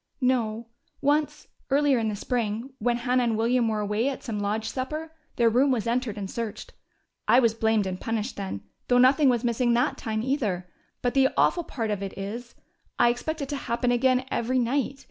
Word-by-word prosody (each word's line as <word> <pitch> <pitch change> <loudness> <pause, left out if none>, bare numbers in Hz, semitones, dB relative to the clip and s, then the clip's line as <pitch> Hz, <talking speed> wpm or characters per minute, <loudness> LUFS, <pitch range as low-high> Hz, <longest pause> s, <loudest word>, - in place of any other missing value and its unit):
"No. 235 -4 0 0.3
Once, 290 +2 0 0.2
earlier 280 -2 +3
in 225 - 0
the 210 - -3
spring, 235 +3 -2
when 240 +2 +1
Hannah 250 +1 +1
and 230 -2 +1
William 235 +1 +2
were 215 -1 0
away 210 +5 0
at 275 - -6
some 220 -4 -3
lodge 210 +2 -1
supper, 305 +7 -4 0.2
their 235 - +3
room 250 +5 +4
was 240 -4 0
entered 235 -2 -1
and 200 -2 -4
searched. 225 +1 -5 0.5
I 245 - +6
was 230 -3 +3
blamed 220 -2 +1
and 185 -1 -4
punished 225 +1 -2
then, 190 - -5 0.2
though 245 - +4
nothing 265 +3 +5
was 240 -1 +1
missing 240 0 +2
that 245 +5 +1
time, 220 -2 -2
either. 215 -10 -1 0.4
But 245 - +1
the 270 -1 +4
awful 345 -2 +3
part 225 -4 -3
of 205 -2 -2
it 195 -1 -6
is: 230 +5 -6 0.4
I 240 - +5
expect 305 +6 -2
it 275 - -6
to 290 - -2
happen 245 -2 -1
again 255 +1 +2
every 250 +3 0
night. 260 +2 0
240 Hz, 200 wpm, -26 LUFS, 220-260 Hz, 0.5 s, I